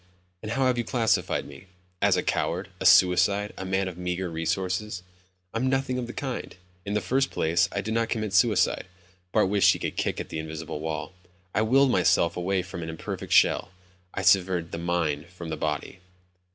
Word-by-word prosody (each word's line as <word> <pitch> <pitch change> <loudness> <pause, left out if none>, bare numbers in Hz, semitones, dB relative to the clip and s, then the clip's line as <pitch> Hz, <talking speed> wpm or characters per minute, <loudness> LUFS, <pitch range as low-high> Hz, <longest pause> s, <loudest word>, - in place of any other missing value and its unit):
And 110 +1 -4
how 135 +2 +1
have 125 -2 +2
you - - +1
classified 115 -2 0
me?" 95 - -13 0.3
"As - - +4
a - - 0
coward. 90 +3 -1
A - - +3
suicide. 95 +3 +4
A - - -6
man 95 0 0
of 90 -1 -7
meager 90 0 -3
resources." 90 +4 -2 0.5
"I'm 125 +3 0
nothing 135 -1 0
of 120 - -4
the 120 - -7
kind. 130 -3 -5 0.3
In 100 - -1
the 105 - +1
first 135 +6 +1
place, 85 +2 +1
I 100 - -2
did 110 +3 -3
not 115 0 0
commit 110 -3 -2
suicide." 100 -4 +3 0.4
Bart - - +3
wished 100 0 +5
he - - -4
could - - -4
kick - - -1
at - - -6
the 80 - -4
invisible 80 -1 -6
wall. 80 +1 -4 0.4
"I 105 - +2
willed 130 +4 +4
myself 90 -3 +3
away 95 +1 0
from 90 -1 -7
an 80 - -5
imperfect 80 - -6
shell. - - +4 0.4
I 95 - -4
severed 90 -2 +3
the 85 - -4
mind 85 -3 -1
from 85 -1 -9
the 80 - -2
body." 75 +3 -3
95 Hz, 195 wpm, -26 LUFS, 85-110 Hz, 0.5 s, wished